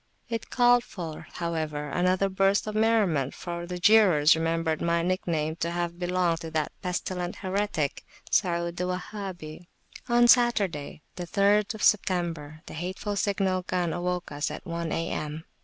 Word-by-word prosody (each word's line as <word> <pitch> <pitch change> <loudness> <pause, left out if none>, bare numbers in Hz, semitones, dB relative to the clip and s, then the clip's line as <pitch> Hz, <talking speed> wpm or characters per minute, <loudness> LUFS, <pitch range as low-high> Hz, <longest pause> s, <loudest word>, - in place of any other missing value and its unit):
It 230 -1 -4
called 245 -1 +4
forth, 165 -8 -7
however[,] 155 -3 -3
another 185 +3 +2
burst 195 +1 +2
of 215 - -4
merriment, 210 - +2
for 175 -1 -5
the 180 0 -4
jeerers 180 -6 +6
remembered 165 -1 -1
my 170 0 +1
nickname 165 -3 -1
to 170 - -1
have 170 0 -3
belonged 175 -2 +1
to 165 - -6
that 155 -1 -1
pestilent 180 -1 -3
heretic, 190 -6 -2 0.3
Saud 170 -2 +1
the 180 - -1
Wahhabi. 180 -3 -6 0.4
On 240 0 +5
Saturday, 200 - +2
the 175 -1 -5
3rd 205 +3 +2
September, 170 -6 +1
the - - -10
hateful 185 +5 -4
signal 195 -2 0
gun 180 -2 -1
awoke 180 0 -3
us 145 +2 -2
at - - -8
one 170 -2 -3
A.M. 160 -1 -3
175 Hz, 145 wpm, -27 LUFS, 165-195 Hz, 0.4 s, jeerers